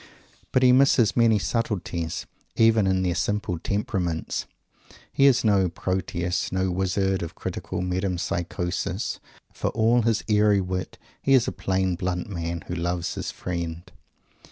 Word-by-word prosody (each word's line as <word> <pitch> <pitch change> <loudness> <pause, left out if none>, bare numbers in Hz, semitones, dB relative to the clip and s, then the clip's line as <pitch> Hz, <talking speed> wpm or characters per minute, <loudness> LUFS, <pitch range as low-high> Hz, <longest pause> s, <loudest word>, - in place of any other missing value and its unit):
But 130 - +3
he 125 - +7
misses 125 -4 +4
many 115 -2 +4
subtleties, 95 -7 -2 0.3
even 110 -3 +4
in 95 0 +2
their 90 -1 +1
simple 105 -2 -1
temperaments. 90 -4 -2 0.7
He 140 - +5
is 130 -3 +4
no 100 -4 +3
Proteus, 90 0 -2
no 95 0 0
Wizard 95 +1 0
of 85 - -6
critical - - -4
metempsychosis. 90 0 -2 0.3
For - - -3
all 115 +2 +3
his 115 -1 +1
airy 105 -1 +4
wit, 90 -1 -3 0.2
he 135 - +4
is 125 -3 +3
"a - - 0
plain, 95 -1 0
blunt 90 0 -2
man, 85 -3 -4
who - - -5
loves 85 0 -2
his - - -4
friend." 85 -1 -4
95 Hz, 140 wpm, -25 LUFS, 90-105 Hz, 0.7 s, he